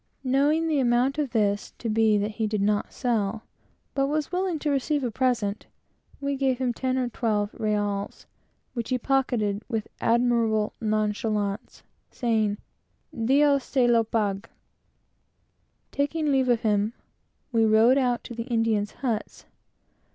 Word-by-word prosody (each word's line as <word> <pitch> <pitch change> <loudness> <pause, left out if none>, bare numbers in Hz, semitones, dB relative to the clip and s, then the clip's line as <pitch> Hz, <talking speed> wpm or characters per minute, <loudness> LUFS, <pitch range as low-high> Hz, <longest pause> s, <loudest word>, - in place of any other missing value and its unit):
Knowing 285 +5 +2
the 305 -3 +1
amount 255 +3 +2
of 290 -3 0
this 205 -3 0
to 235 - -5
be 220 -1 +3
that 205 +1 -1
he 220 0 -2
did 215 0 -1
not 205 0 0
sell 225 -3 -1
it, - - -41 0.4
but 275 0 +1
was 300 +1 -1
willing 365 -2 -1
to 300 0 -1
receive 285 +1 0
a 245 - -1
present, 235 -4 -1 0.5
we 280 0 -2
gave 265 -2 +1
him 250 -1 -1
ten 260 +2 -1
or 255 -1 0
twelve 215 -3 -1
reals, 205 -2 -2 0.5
which 235 -3 -4
he 255 - +1
pocketed 240 -6 0
with 225 -3 -2
admirable 230 -2 +2
nonchalance, 215 -1 -1 0.3
saying, 220 -4 0 0.6
"Dios 275 +4 +3
se 255 -1 +1
lo 235 -1 +4
pague." 205 -3 -2 1.4
Taking 295 +1 0
leave 265 -2 +2
of 235 -2 +3
him, 210 0 +1 0.6
we 230 -2 +3
rode 220 +5 +5
out 245 -2 0
to 240 - -8
the 230 +1 -5
Indians' 225 -4 0
huts. 225 -3 -3
235 Hz, 145 wpm, -26 LUFS, 215-265 Hz, 1.4 s, rode